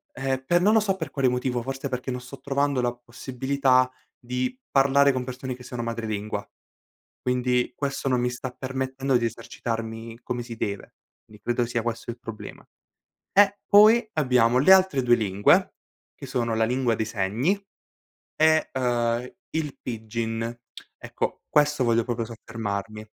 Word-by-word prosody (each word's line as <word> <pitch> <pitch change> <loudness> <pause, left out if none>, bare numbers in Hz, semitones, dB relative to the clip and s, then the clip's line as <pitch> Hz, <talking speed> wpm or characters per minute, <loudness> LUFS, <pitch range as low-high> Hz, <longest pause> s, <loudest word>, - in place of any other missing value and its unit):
Ehm, 130 0 -2
per 175 +3 +3
non 210 +3 +4
lo 220 - +6
so 195 -2 0
per 160 -4 -5
quale 135 -2 +1
motivo, 125 -1 0
forse 135 +1 -4
perché 125 0 -3
non 125 0 -4
sto 125 +1 -11
trovando 140 -1 0
la 120 0 0
possibilità 130 +1 +1 0.3
di 125 - -2
parlare 140 +1 +4
con 130 -1 -2
persone 130 0 -5
che 125 - -13
sono 120 -1 -5
madrelingua. 110 -3 -3 0.7
Quindi, 125 0 0
questo 140 -1 -2
non 125 -1 +2
mi 125 - +1
sta 125 +1 -5
permettendo 130 +1 -2
di 120 - +1
esercitarmi 115 0 -5
come 120 -1 -3
si 115 -1 -8
deve, 100 -3 -4 0.3
quindi 105 -1 -17
credo 120 0 0
sia 120 -1 -1
questo 120 0 -4
il 120 - -8
problema. 115 -2 -9 0.7
Eh, 200 0 +4
poi 215 +3 +7
abbiamo 125 -5 +3
le 170 +9 +7
altre 185 -8 +4
2 120 -1 +5
lingue, 100 -3 +3 0.4
che - - -9
sono 115 -2 -1
la 110 - +2
lingua 125 -1 +1
dei 110 - -1
segni 110 - 0 0.8
e, 155 0 +4
ehm, 120 -1 0 0.2
il 155 -3 -3
pidgin. 115 0 -3 0.4
Ecco, - - -4
questo 150 -2 +3
voglio 115 -1 +3
proprio 115 -1 -2
soffermarmi. 110 -2 -5
125 Hz, 160 wpm, -25 LUFS, 115-135 Hz, 0.8 s, poi